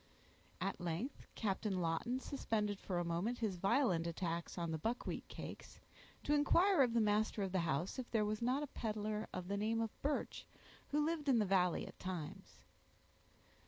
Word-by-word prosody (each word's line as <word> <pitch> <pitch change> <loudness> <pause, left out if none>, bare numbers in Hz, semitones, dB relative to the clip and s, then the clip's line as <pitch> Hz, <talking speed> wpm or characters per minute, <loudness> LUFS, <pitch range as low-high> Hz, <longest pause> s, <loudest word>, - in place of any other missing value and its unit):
At - - -2
length 175 - -3
Captain 200 -2 0
Lawton 175 +10 0
suspended 210 -7 -1
for 185 - -2
a 175 - 0
moment 175 +9 0
his 215 -6 -1
violent 185 -3 +3
attacks 170 0 -3
on 170 -2 -1
the 160 - -2
buckwheat 230 +9 -2
cakes, - - -8 0.4
to 295 - +2
inquire 340 +5 +5
of 245 -3 +4
the - - +5
master 210 0 +2
of 190 - -2
the 190 - +2
house, 170 - 0
if 250 - -5
there 220 -2 +2
was 215 +1 -1
not 255 +5 +2
a 290 - -7
peddler 215 -1 -2
of 185 -1 -4
the 200 +1 -1
name 220 +2 +1
of 225 -2 0
Birch 290 +1 -1 0.4
who 295 +1 +2
lived 310 -3 0
in 255 - +6
the 215 - +3
valley 180 -2 +3
at - - -11
times. 180 -5 -6
210 Hz, 180 wpm, -38 LUFS, 180-245 Hz, 0.4 s, in